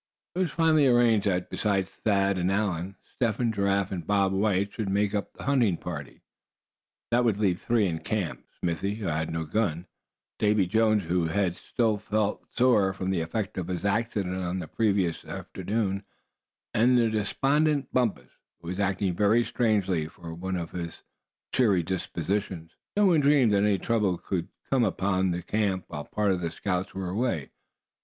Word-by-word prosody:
It 180 - -3
was 185 -3 +1
finally 155 -2 +4
arranged 120 -4 +4
that 90 -2 -1
besides 100 -3 0
Thad 100 -2 +1
and 90 +2 +1
Allan, 95 -2 -1 0.2
Step 115 -4 0
Hen, 120 -2 0
Giraffe 100 -1 +1
and 85 -4 -5
Bob 100 -2 +2
White 100 0 +1
should 105 -3 -3
make 100 +1 +1
up 100 -1 -2
the - - -10
hunting 120 -10 +2
party. 75 -6 -7 0.9
This 120 +1 +4
would 115 -5 +2
leave 95 -4 +1
three 115 -3 +2
in 80 -4 -1
camp 100 -4 -3 0.2
Smithy 95 +4 -1
who 110 -2 -6
had 80 -1 -1
no 80 0 -3
gun, 85 -1 -1 0.5
Davy 105 -2 +3
Jones, 110 +2 +2
whose 85 0 0
head 90 0 0
still 110 -1 0
felt 105 0 -1
sore 120 -7 +4
from 95 0 -3
the 90 -3 0
effect 95 +4 -3
of 85 - -4
his 90 +1 -3
accident 100 -3 0
on 90 0 -2
the 90 -4 -5
previous 100 -6 0
afternoon; 100 -2 -3 0.7
and 125 +3 +4
the 115 -2 +3
despondent 140 +7 +1
Bumpus, 105 - 0 0.3
who 85 - -8
was 90 +2 -4
acting 95 -1 0
very 105 +5 +4
strangely, 95 -9 +1
for 85 +1 -10
one 95 +3 -4
of 85 -2 -4
his 85 -2 -6 0.5
cheery 100 -9 +3
disposition. 90 0 -3 0.3
No 210 - +5
one 175 -5 +5
dreamed 140 -6 +4
that - - +4
any 105 -1 +3
trouble 105 -5 +1
could 90 -2 -3 0.2
come 130 -3 +2
upon 95 -2 +1
the 85 0 -2
camp 95 -2 -1
while 75 0 -6
part 105 -2 0
of 90 -2 -1
the 85 - -1
scouts 90 +2 -3
were 95 -2 -3
away. 100 - -1
100 Hz, 175 wpm, -27 LUFS, 90-110 Hz, 0.9 s, No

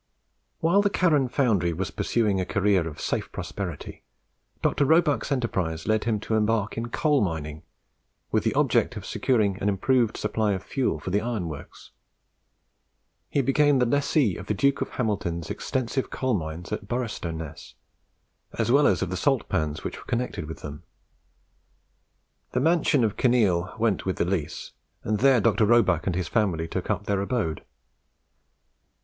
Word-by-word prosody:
While 175 +5 +4
the 205 - +2
Carron 150 -9 +2
foundry 105 - +1
was 90 +3 -3
pursuing 105 -5 0
a - - 0
career 95 0 +1
of 75 - -8
safe - - -2
prosperity, - - -6 0.6
Dr. 145 - +2
Roebuck's 155 0 +2
enterprise 95 - -1
led 110 0 +1
him 110 -3 +1
to 110 - -3
embark 110 -1 +1
in 115 +1 -4
coal 145 +3 +2
mining, 80 -5 -3 0.7
with - - +2
the - - 0
object - - +2
of - - -7
securing 105 -6 +1
an 105 - +2
improved 115 +3 +1
supply 110 -2 0
of 95 - -4
fuel 135 -2 -1
for 95 - -5
the 100 +2 +2
iron 115 -7 -2
works. 75 -3 -10 1.4
He 140 - +1
became 145 +1 +3
the 125 - +3
lessee 140 - +1
of 90 - -9
the 105 - 0
Duke 140 +7 +2
of - - -1
Hamilton's 85 -8 -2
extensive 130 0 -2
coal 130 -1 -1
mines 80 -2 -4
at 100 - -4
Boroughstoness, 85 -10 -5 0.8
as - - +1
well 145 +3 +5
as 95 -3 +2
of 95 - -4
the - - -1
salt 135 +7 +1
pans 80 0 -1
which - - -5
were - - -13
connected 120 -10 -3
with 80 - -8
them. 75 +1 -7 1.7
The 125 - +1
mansion 155 -3 +3
of 110 -3 0
Kinneil 105 -8 +2
went 110 -4 0
with 95 - 0
the - - 0
lease, 90 -5 -3 0.3
and 105 -1 -1
there 135 -1 +5
Dr. 105 0 +3
Roebuck 95 -8 +3
and 90 - 0
his 90 -2 -2
family 90 -6 0
took 90 +2 -4
up 105 -1 -1
their 100 -1 0
abode. 100 -7 -2
105 Hz, 165 wpm, -26 LUFS, 90-125 Hz, 1.7 s, well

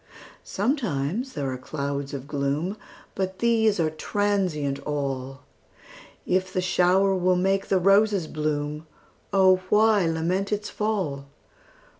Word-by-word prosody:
Sometimes 215 - -2
there 140 -3 -3
are 130 - -5
clouds 140 +1 -4
of 140 -1 -6
gloom, 145 +6 -1 0.4
But 190 -1 -3
these 220 -4 +2
are 160 -2 +1
transient 175 -6 -1
all; 135 -2 -4 0.8
If 185 +1 0
the 185 - -1
shower 185 +2 +3
will 185 0 +2
make 195 +2 +1
the 195 - +2
roses 195 0 +3
bloom, 150 0 -3 0.4
O 190 -2 +5
why 210 -3 +4
lament 175 +5 -1
its 210 0 -2
fall? 185 -11 -2
180 Hz, 120 wpm, -25 LUFS, 145-200 Hz, 0.8 s, O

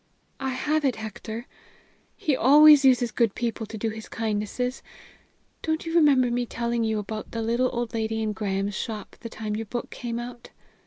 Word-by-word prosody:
"I 265 - -2
have 300 +4 0
it, 265 -4 +2
Hector. 220 +2 -6 0.7
He 295 - +1
always 295 +3 +8
uses 250 -3 +4
good 230 -4 +1
people 230 -2 -3
to 220 - -7
do 225 +2 -1
his 220 0 -9
kindnesses. 225 +3 -2 0.8
Don't 315 +1 -1
you 330 - -4
remember 280 -7 +5
me 245 0 -1
telling 235 0 -1
you 220 -1 0
about 215 +1 -5
the 230 - -4
little 240 +3 +1
old 240 -2 -3
lady 220 0 -1
in 215 -1 -1
Graham's 200 0 -2
shop 215 +2 -5
the 230 - -7
time 215 -2 -4
your 225 0 -4
book 240 +3 -5
came 235 -2 -4
out?" 240 0 -7
235 Hz, 180 wpm, -26 LUFS, 220-255 Hz, 0.8 s, always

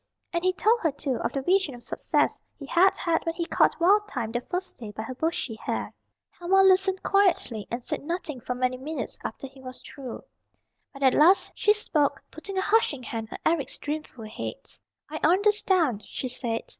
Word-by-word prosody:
And 340 0 -1
he 370 - +4
told 445 +5 +3
her, 325 -8 +1
too, 270 -2 -2
of - - -2
the 275 - -3
vision 365 -5 +2
of 240 - -13
success - - 0 0.2
he 280 - -8
had 355 +7 +4
had 335 -2 0
when 330 0 -2
he 340 - -2
caught - - +2
Wild 410 +5 +4
Thyme 225 - -3
that 240 +1 -4
first 365 +1 -3
day 225 -3 -8
by 215 +1 -6
her 255 - -6
bushy 315 -3 -2
hair. 220 - -4 0.4
Helma 380 +2 +3
listened 380 0 +4
quietly, 360 - +2
and 235 +1 -4
said - - -3
nothing 305 -5 -4
for 250 - -3
many 255 0 0
minutes 300 +5 -5
after - - -5
he 265 0 -12
was 255 -1 -8
through. 260 -4 -8 0.7
But 275 0 -7
at 265 - +5
last 350 +6 +5
she 420 - +3
spoke, 300 -9 0
putting 380 +5 -7
a - - +2
hushing 385 - +2
hand 225 -1 -5
on - - -5
Eric's 320 -4 0
dreamful 295 -6 -5
head. 355 - -7 0.4
"I 310 +1 -5
understand," 365 - +3
she 260 - -4
said. 235 -2 -2
310 Hz, 195 wpm, -26 LUFS, 255-370 Hz, 0.7 s, at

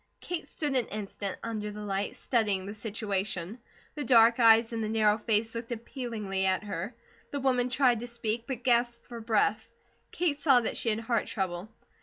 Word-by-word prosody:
Kate 350 -2 -5
stood 290 -3 -3
an 250 -3 +3
instant 200 -1 -4
under 215 -2 -3
the 210 0 -7
light, 200 0 -2
studying 205 -6 0
the 200 - -6
situation. 205 -2 -3 0.3
The 295 - -3
dark 230 -1 +6
eyes 230 0 +6
in 225 - -2
the 215 - -2
narrow 215 -1 +3
face 220 +1 +1
looked 230 +1 -6
appealingly 220 -5 -3
at 190 +2 +1
her. 205 +2 -5 0.3
The 285 - -3
woman 250 -2 +1
tried 250 -3 +3
to 240 - -6
speak, 235 -1 -3
but 250 -3 -4
gasped 240 -1 +2
for 235 -1 -8
breath. 220 -1 +1 0.5
Kate 320 -5 0
saw 275 -4 +5
that 225 - -2
she 230 - -1
had 220 +1 0
heart 230 -1 0
trouble. 185 0 -3
225 Hz, 185 wpm, -29 LUFS, 210-240 Hz, 0.5 s, dark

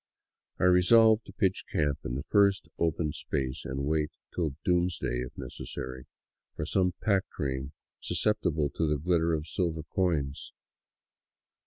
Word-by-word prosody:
I - - -1
resolved 110 +5 +6
to - - -9
pitch 95 -3 0
camp 75 -3 +1
in - - -3
the 70 - -3
first 100 +1 +3
open 80 -2 +1
space 65 -2 -3
and 70 +1 -3
wait, 75 0 +1 0.2
till 80 -6 -1
doomsday 90 -8 +1
if 60 0 -6
necessary, 65 0 -7 0.5
for 75 - -3
some 90 +1 +1
pack 100 -3 +2
train 65 -1 -3 0.3
sus - - -1
ceptible 85 -9 +1
to 80 - 0
the 75 0 +1
glitter 85 +2 +1
of 75 -1 -4
silver 80 -3 -2
coins. 75 -5 -1
80 Hz, 145 wpm, -29 LUFS, 70-90 Hz, 0.5 s, resolved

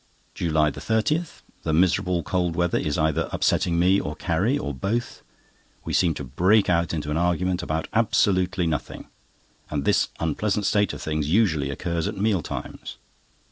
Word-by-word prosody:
JULY 80 -3 +1
30.—The 110 - -2
miserable 90 +1 +2
cold 90 0 -1
weather 85 0 +1
is 75 - -1
either 80 -1 0
upsetting 85 -1 +1
me 95 +3 +4
or 75 - -4
Carrie, 95 - 0
or 75 - -4
both. 105 - -3 0.6
We - - -4
seem 85 -4 +2
to 70 - -5
break 90 - +3
out 85 0 +1
into 75 -2 -3
an 75 - 0
argument 90 +1 0
about 80 -1 -2
absolutely 95 -5 +2
nothing, 80 -4 -3 0.6
and 70 -2 -2
this - - +3
unpleasant 100 +6 -1
state 100 -1 +2
of - - -7
things 75 -1 -2
usually 80 -8 +2
occurs 85 +4 -2
at - - -4
meal 100 -2 +1
times. - - -7
85 Hz, 155 wpm, -24 LUFS, 80-95 Hz, 0.6 s, me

